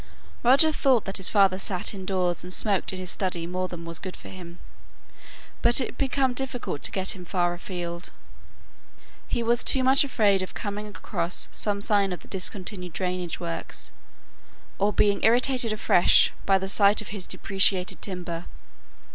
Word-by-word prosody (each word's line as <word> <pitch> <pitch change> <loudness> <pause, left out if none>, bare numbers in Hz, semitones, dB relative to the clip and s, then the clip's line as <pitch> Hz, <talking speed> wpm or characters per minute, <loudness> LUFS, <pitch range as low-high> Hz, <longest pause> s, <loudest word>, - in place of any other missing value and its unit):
Roger 275 +6 +5
thought 265 -6 +2
that 195 0 0
his 190 - +3
father 195 -3 +3
sate 185 0 -2
indoors 185 -2 -2
and 180 - -8
smoked 200 0 +2
in 190 - -6
his 185 -1 -3
study 180 -3 -2
more 185 +1 -3
than 170 -2 -8
was 165 -1 -5
good 185 -1 -7
for - - -12
him, 175 -2 -11 1.0
but 240 +2 +4
it 255 - -1
had - - -12
become 270 -1 +1
difficult 250 - -3
to - - +2
get 190 0 0
him 180 - -10
far 175 0 0
afield; 175 -1 -6 1.2
he 235 - -1
was 235 +1 +2
too 265 - +3
much 265 +2 +5
afraid 210 -8 +2
of 185 - -7
coming 210 0 -5
across 180 -4 -2
some 205 -1 -1
sign 200 -2 +2
of 180 - -5
the - - -14
discontinued 185 -2 -4
drainage 180 -2 -3
works, 170 -1 -5 0.9
or 200 +1 +2
being 205 -1 +1
irritated 245 0 +3
afresh 205 -4 +4
by 195 -1 +5
the 190 0 -4
sight 200 +1 +4
of - - -12
his 200 -3 -6
depreciated 195 -1 0
timber. 175 -3 -5
195 Hz, 170 wpm, -25 LUFS, 180-215 Hz, 1.2 s, Roger